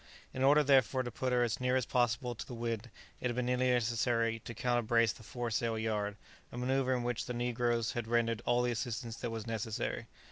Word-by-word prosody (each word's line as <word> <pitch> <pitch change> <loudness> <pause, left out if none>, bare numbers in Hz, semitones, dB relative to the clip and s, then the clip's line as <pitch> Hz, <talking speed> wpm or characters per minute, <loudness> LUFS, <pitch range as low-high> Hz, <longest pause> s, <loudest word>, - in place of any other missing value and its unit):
In 130 - -1
order, 145 +2 +6
therefore, 130 -3 +4
to 120 - -5
put 130 +3 -2
her 125 -1 +3
as 115 -2 -1
near 125 0 +1
as 130 -2 +2
possible 120 0 +1
to 105 -3 -8
the 125 - -6
wind, 115 0 -3 0.3
it - - -1
had 120 - -2
been 125 0 0
merely 125 +1 +2
necessary 115 -1 +1
to 120 +1 -8
counter 120 +1 +1
brace 115 -1 +3
the - - -14
fore 120 +1 -4
sail 115 0 0
yard, 105 -2 -1 0.3
a - - -8
manoeuvre 130 +1 +1
in 120 - -3
which 120 -1 -2
the 125 - -3
negroes 120 -1 0
had 120 -2 -3
rendered 115 -1 +1
all 120 0 +2
the 125 - +1
assistance 115 0 -3
that 120 - -3
was 115 -1 -5
necessary. 110 -1 -3
120 Hz, 225 wpm, -33 LUFS, 115-125 Hz, 0.3 s, order